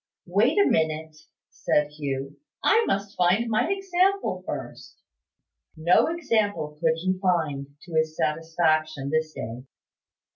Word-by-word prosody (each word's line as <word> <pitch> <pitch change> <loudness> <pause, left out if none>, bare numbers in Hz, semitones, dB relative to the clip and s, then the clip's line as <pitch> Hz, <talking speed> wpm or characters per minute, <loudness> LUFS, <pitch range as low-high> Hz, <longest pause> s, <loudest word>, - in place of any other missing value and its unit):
"Wait 205 - +2
a 405 - +6
minute," 160 0 0 0.4
said 150 0 0
Hugh. 140 -1 -4 0.3
"I 455 +1 +4
must 200 0 -2
find 185 +6 +2
my 215 - +1
example 390 0 +1
first." - - -7 0.8
No 165 +3 +4
example 215 - -1
could 160 -1 +3
he 185 +3 -1
find, 160 -7 0 0.2
to 175 - -12
his 160 0 0
satisfaction, 155 -2 0
this 155 0 0
day. 115 +2 -6
165 Hz, 120 wpm, -25 LUFS, 155-205 Hz, 0.8 s, a